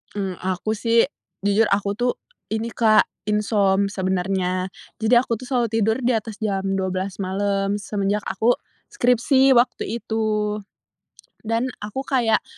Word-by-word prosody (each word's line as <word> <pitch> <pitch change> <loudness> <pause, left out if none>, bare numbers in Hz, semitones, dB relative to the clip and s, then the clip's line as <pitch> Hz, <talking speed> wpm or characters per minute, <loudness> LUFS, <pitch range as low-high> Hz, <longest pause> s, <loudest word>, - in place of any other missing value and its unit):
Mmm, 190 -3 -3
aku 185 +3 -2
sih 230 +1 +3 0.4
jujur 205 +2 +3
aku 200 0 +1
tuh 245 0 +2 0.3
ini, 225 +1 -3
Kak, 215 -2 +5 0.2
insom 200 -2 +2
sebenarnya. 185 -1 -1 0.3
Jadi 225 +3 +3
aku 240 -2 -1
tuh 245 - -10
selalu 245 -2 0
tidur 220 +1 +1
di 245 -1 +1
atas 220 -1 -4
jam 195 -3 -1 0.2
12.00 190 +1 -3
malam 195 +1 0
semenjak 205 0 -1
aku 220 +6 +2 0.3
skripsi 265 - +3
waktu 235 -2 +2
itu, 215 -2 -1 0.9
dan 235 +3 0
aku 210 +6 -5
kayak 240 -6 +2
210 Hz, 135 wpm, -22 LUFS, 195-230 Hz, 0.9 s, Kak